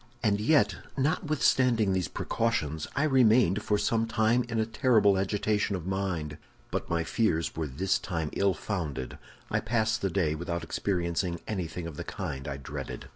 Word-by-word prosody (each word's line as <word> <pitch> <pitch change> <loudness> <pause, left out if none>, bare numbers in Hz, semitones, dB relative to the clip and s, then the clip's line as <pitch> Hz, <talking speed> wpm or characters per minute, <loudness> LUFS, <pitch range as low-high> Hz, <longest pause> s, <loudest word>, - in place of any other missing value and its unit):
"And 105 -2 +2
yet, 110 -4 +3 0.2
notwithstanding 130 -7 +2
these 90 -4 0
precautions, 80 -10 -1
I 140 - +2
remained 120 - +4
for 105 0 +1
some 115 +2 +1
time 115 +2 +2
in 115 -1 -1
a 110 - +2
terrible 110 -3 +3
agitation 105 +1 0
of 90 -3 -5
mind. 90 -6 -2 0.3
But - - -3
my 85 -1 +1
fears 85 -4 0
were 80 -1 -2
this 90 +8 0
time 80 -5 -3
ill 100 -2 +2
founded; 75 -9 -4 0.3
I - - +2
passed 110 0 0
the 95 - +1
day 85 -4 +1
without 85 +2 -3
experiencing 85 -2 -1
anything 90 -4 -3
of 80 -3 -7
the - - -4
kind 70 -1 -5
I 70 -2 -3
dreaded. 70 - -7
100 Hz, 165 wpm, -29 LUFS, 85-110 Hz, 0.3 s, remained